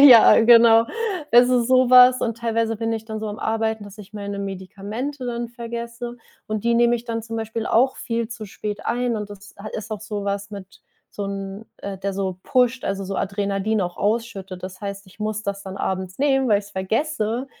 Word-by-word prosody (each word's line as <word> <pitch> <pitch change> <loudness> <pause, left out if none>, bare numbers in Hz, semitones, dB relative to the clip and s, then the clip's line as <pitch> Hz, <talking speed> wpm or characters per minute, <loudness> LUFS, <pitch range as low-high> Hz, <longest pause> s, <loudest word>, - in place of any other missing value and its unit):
ja, 250 -6 +9
genau. 230 0 +7 0.4
Das 245 +1 +7
ist 245 -1 +2
sowas, 255 0 +7
und 230 -1 -1
teilweise 230 -1 0
bin 225 +1 -2
ich 220 -1 -3
dann 220 -1 -5
so 215 - -3
am 205 - -6
Arbeiten, 220 -1 -1
dass 205 +1 -12
ich 200 0 -12
meine 200 -1 -5
Medikamente 200 +8 -5
dann 235 -1 -3
vergesse, 235 0 -6 0.3
und 215 0 -3
die 235 - +3
nehme 240 0 +4
ich 235 - -10
dann 230 -1 -3
zum 225 0 -6
Beispiel 225 0 -3
auch 260 +3 +3
viel 230 -2 -2
zu 225 -3 -7
spät 205 +1 -6
ein. 245 0 0
Und 210 -1 -4
das 205 0 -12
ha 215 +2 -7
ist 215 +1 -6
auch 210 - -4
sowas 205 -1 -3
mit 195 -2 -10 0.3
so 205 - -5
'n 195 +2 -5
äh, 195 -1 -6
der 195 0 -3
so 190 -2 -2
pusht, 250 0 +2
also, 195 0 -2
so 195 - -4
Adrenalin 200 +2 -1
auch 175 -1 -4
ausschüttet. 200 -4 -2
Das 185 +1 -7
heißt, 200 -1 -6
ich 185 - -19
muss 215 0 -2
das 200 -1 -4
dann 190 0 -7
abends 190 0 -3
nehmen, 270 -2 +2
weil 205 - +5
ich's 205 - -14
vergesse, 225 +4 -1
220 Hz, 205 wpm, -23 LUFS, 200-235 Hz, 0.4 s, ja